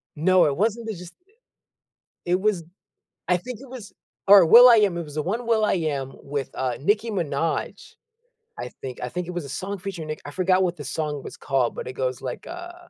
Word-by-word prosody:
No, 185 +4 +4
it 140 -2 +1
wasn't 225 +3 0
the 220 - -2
just 180 -1 -10 1.1
It 180 +2 +1
was 195 -4 0 0.6
I 180 0 +3
think 245 +4 -8
it 270 -2 -13
was 240 -6 -10 0.3
or 195 -3 +9
will.i.am, 225 -3 +7
it 170 - -3
was 150 -1 -11
the 155 - 0
one 225 +9 -3
will.i.am 165 - 0
with, 140 -2 -4
uh, 125 -2 -2
Nicki 215 +7 +1
Minaj, 165 -5 -3 0.7
I - - -5
think. 130 -2 -7
I 125 - -3
think 180 +5 -4
it - - -4
was 175 -3 -4
a - - -9
song 195 +8 -4
featuring 175 -4 -6
Nick 155 - -5
I 145 - -7
forgot 185 +2 +2
what 175 -1 -1
the 145 - -8
song 150 -1 -3
was - - -8
called, 130 -4 0
but - - -6
it 130 - -5
goes 130 0 -3
like, 130 -2 -6
uh 350 +1 -8
180 Hz, 205 wpm, -24 LUFS, 145-210 Hz, 1.1 s, or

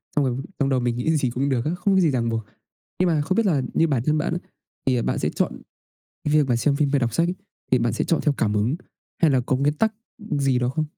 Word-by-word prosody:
xong 145 -2 +3
rồi 125 -1 -1 0.2
trong 140 -1 +2
đầu 130 -1 +2
mình 120 -1 -1
nghĩ 160 +6 +1
gì 130 -4 0
cũng 135 +4 -1
được 125 -1 0
á, 155 - 0
không 195 +2 +1
có - - +5
gì 165 -5 +3
ràng 115 -3 0
buộc. 115 -1 -2 0.6
Nhưng 185 - +3
mà 155 -3 +2
không 185 +6 -1
biết 230 -1 +2
là 150 -8 +2
như 165 - +3
bản 130 -6 0
thân 155 0 +2
bạn 170 +2 -1
á, 175 - -1 0.5
thì 125 -3 +2
bạn - - -1
sẽ - - 0
chọn - - -2 0.6
cái 150 0 +1
việc 150 -3 +4
mà 120 - +2
xem 140 +3 +1
phim 145 -2 +1
hay 140 - +4
đọc 120 -2 -1
sách 170 +1 +2
ấy, 180 - -1 0.4
thì 130 - +6
bạn 115 -2 0
sẽ - - -1
chọn 165 - +1
theo 150 -3 +2
cảm 105 -2 0
hứng 115 +9 +1 0.5
hay 160 - +6
là 130 -2 +3
có 130 +1 0
nguyên 145 +2 +1
tắc 220 +6 +1 0.4
gì 135 -3 +2
đó 125 0 0
không? 155 +4 -1
140 Hz, 290 wpm, -23 LUFS, 125-155 Hz, 0.6 s, thì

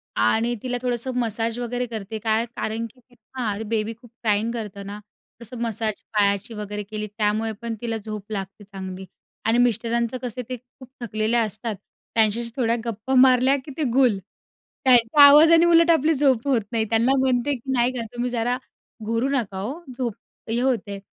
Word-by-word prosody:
आणि 235 +2 +2
तिला 250 -1 -1
थोडंसं 250 0 -1
मसाज 230 0 -1
वगैरे 245 +1 -2
करते. 220 -1 -6
काय 220 +1 +1
कारण 225 +1 -2
की 245 +1 -25 0.2
हां, 210 -5 -1
बेबी 225 0 -1
खूप 240 +2 -18
क्रायिंग 215 0 +1
करतो 210 -4 -6
ना, 200 +1 -7 0.4
तसं 235 +2 -8
मसाज 225 -2 -1 0.2
पायाची 200 +2 +2
वगैरे 210 -1 -5
केली 215 +1 -5
त्यामुळे 215 +1 0
पण 230 -1 -3
तिला 230 -1 -2
झोप 215 -1 -8
लागते 195 0 -5
चांगली 190 -1 -8 0.4
आणि 225 +2 +3
मिस्टरांचं 235 0 +1
कसं 250 -1 -4
ते 255 - -2
खूप 250 +1 -18
थकलेले 220 0 0
असतात 220 0 -1 0.4
त्यांच्याशी 225 +1 +3
थोड्या 235 -3 +1
गप्पा 230 +3 -3
मारल्या 255 +1 +5
की 290 - -8
ते 315 - 0
गुल. 250 -6 +4 0.7
त्यांच्या 250 +3 +6
आवाजाने 320 +4 +7
उलट 335 0 +5
आपली 320 0 +3
झोप 270 -3 +2
होत 260 -5 +3
नाही. 225 -2 0
त्यांना 230 +3 +3
म्हणते 260 +1 +1
की 260 +2 -6
नाही 245 0 +2
का 245 - -3
तुम्ही 245 +1 -2
जरा 245 +1 0 0.5
घोरू 230 +4 0
नका 235 -9 -1
हो 260 - -5
झोप 240 -4 -2 0.4
हे 230 +1 0
होते. 220 -6 -1
230 Hz, 170 wpm, -23 LUFS, 215-250 Hz, 0.7 s, आवाजाने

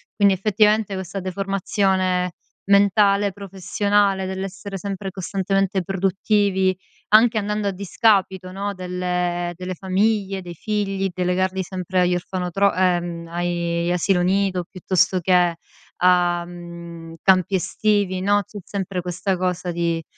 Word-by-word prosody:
Quindi 200 -2 +4
effettivamente 210 +1 +2
questa 190 +1 -5
deformazione 190 -1 0 0.4
mentale, 200 0 +4
professionale, 200 +1 0
dell'essere 195 +1 -5
sempre 195 0 -5
costantemente 195 0 -1
produttivi, 195 0 +1 0.3
anche 220 +2 +5
andando 210 0 -1
a 200 - +1
discapito, 190 -1 +1
no, 200 +2 -3
delle 180 -1 -2
delle 185 +1 -5
famiglie, 195 +1 0
dei 175 -1 -9
figli, 195 0 -1
delegarli 185 +1 0
sempre 185 0 -3
agli 180 0 +2
orfanotro 185 +2 0
ehm, 175 -2 0
ai 170 0 -2
gli 175 - 0
asilo 180 +1 +2
nido 190 -1 +1
piuttosto 185 0 +1
che 180 -1 +3 0.4
a, 175 -1 +3
mhmm, 170 -1 -10
campi 190 0 +3
estivi, 195 0 0
no. 205 +1 +3
C'è 205 - -12
sempre 190 -1 -4
questa 180 +2 -2
cosa 180 -1 -2
di 170 -1 -1
190 Hz, 120 wpm, -22 LUFS, 180-200 Hz, 0.4 s, anche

